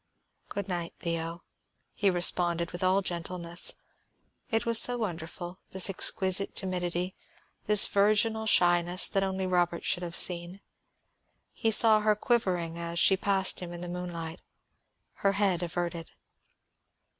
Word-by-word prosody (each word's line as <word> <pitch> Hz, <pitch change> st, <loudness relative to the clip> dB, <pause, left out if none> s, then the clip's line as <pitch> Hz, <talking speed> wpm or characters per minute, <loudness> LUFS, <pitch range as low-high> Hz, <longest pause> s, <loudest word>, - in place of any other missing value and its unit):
"Good 200 Hz, -, -5 dB
night, 175 Hz, -3 st, -5 dB
Theo," 170 Hz, 0 st, -4 dB, 0.5 s
he 200 Hz, -, 0 dB
responded 175 Hz, -1 st, +1 dB
with 175 Hz, +1 st, -6 dB
all 190 Hz, +2 st, +2 dB
gentleness. 175 Hz, -1 st, -2 dB, 0.7 s
It 225 Hz, -2 st, -1 dB
was 230 Hz, -1 st, +5 dB
so 245 Hz, 0 st, +4 dB
wonderful, 175 Hz, -3 st, -6 dB
this 190 Hz, +1 st, 0 dB
exquisite 190 Hz, +1 st, +3 dB
timidity, 180 Hz, -1 st, -3 dB, 0.5 s
this 210 Hz, -1 st, +6 dB
virginal 215 Hz, +2 st, +1 dB
shyness 175 Hz, -1 st, +3 dB
that 195 Hz, -, 0 dB
only 190 Hz, 0 st, -3 dB
Robert 175 Hz, -2 st, -1 dB
should 175 Hz, -, -1 dB
have 175 Hz, -1 st, -6 dB
seen. 175 Hz, +1 st, -1 dB, 0.9 s
He 225 Hz, -, -1 dB
saw 220 Hz, 0 st, +6 dB
her 210 Hz, 0 st, +1 dB
quivering 185 Hz, -8 st, -2 dB
as 170 Hz, 0 st, -5 dB
she 190 Hz, -, +4 dB
passed 195 Hz, 0 st, +1 dB
him 180 Hz, -1 st, -8 dB
in 175 Hz, -, -8 dB
the 175 Hz, -, -6 dB
moonlight, 175 Hz, -1 st, -7 dB, 0.8 s
her 195 Hz, -1 st, 0 dB
head 195 Hz, -3 st, 0 dB
averted. 170 Hz, -1 st, -5 dB
180 Hz, 135 wpm, -28 LUFS, 175-200 Hz, 0.9 s, this